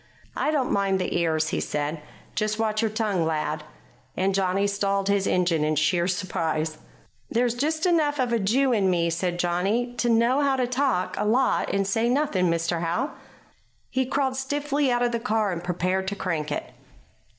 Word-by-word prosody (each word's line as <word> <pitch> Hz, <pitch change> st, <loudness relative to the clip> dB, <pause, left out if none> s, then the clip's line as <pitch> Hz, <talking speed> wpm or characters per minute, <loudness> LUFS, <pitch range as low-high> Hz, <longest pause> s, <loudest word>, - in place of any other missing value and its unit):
"I -, -, 0 dB
don't 285 Hz, -5 st, 0 dB
mind 195 Hz, -1 st, +2 dB
the 185 Hz, -, -2 dB
ears," 160 Hz, -2 st, +1 dB
he -, -, -1 dB
said. 150 Hz, +1 st, -3 dB, 0.3 s
"Just 215 Hz, 0 st, -1 dB
watch 215 Hz, -1 st, 0 dB
your 225 Hz, -, +1 dB
tongue, 210 Hz, -5 st, 0 dB
lad." 155 Hz, -1 st, -1 dB, 0.5 s
And 190 Hz, +1 st, +1 dB
Johnny 195 Hz, +1 st, +1 dB
stalled 200 Hz, -1 st, 0 dB
his 200 Hz, -1 st, +2 dB
engine 175 Hz, -4 st, +2 dB
in 155 Hz, 0 st, +1 dB
sheer 170 Hz, +4 st, +2 dB
surprise. 160 Hz, -4 st, -2 dB, 0.5 s
"There's 240 Hz, 0 st, +1 dB
just 310 Hz, +7 st, -1 dB
enough 310 Hz, -5 st, +2 dB
of 255 Hz, -3 st, 0 dB
the 235 Hz, -, +2 dB
Jew 250 Hz, +6 st, +2 dB
in 200 Hz, -4 st, +2 dB
me," 170 Hz, -2 st, +1 dB
said 175 Hz, +1 st, -1 dB
Johnny, 195 Hz, +8 st, 0 dB
"to 240 Hz, -, +1 dB
know 235 Hz, +4 st, +3 dB
how 280 Hz, -1 st, +2 dB
to 255 Hz, -1 st, +1 dB
talk 250 Hz, -6 st, 0 dB
a -, -, +1 dB
lot 250 Hz, +5 st, +2 dB
and 195 Hz, 0 st, +1 dB
say 225 Hz, +4 st, +1 dB
nothing, 245 Hz, -9 st, +1 dB
Mr. 165 Hz, 0 st, 0 dB
Howe." 175 Hz, -, -1 dB, 0.8 s
He 260 Hz, -1 st, 0 dB
crawled 265 Hz, -1 st, 0 dB
stiffly 285 Hz, 0 st, 0 dB
out 245 Hz, 0 st, +1 dB
of 240 Hz, -, +1 dB
the 235 Hz, -, -1 dB
car 220 Hz, -3 st, 0 dB
and 170 Hz, -1 st, -4 dB
prepared 185 Hz, +2 st, -1 dB
to 200 Hz, -, -2 dB
crank 160 Hz, -6 st, -2 dB
it. -, -, -4 dB
200 Hz, 185 wpm, -25 LUFS, 175-245 Hz, 0.8 s, know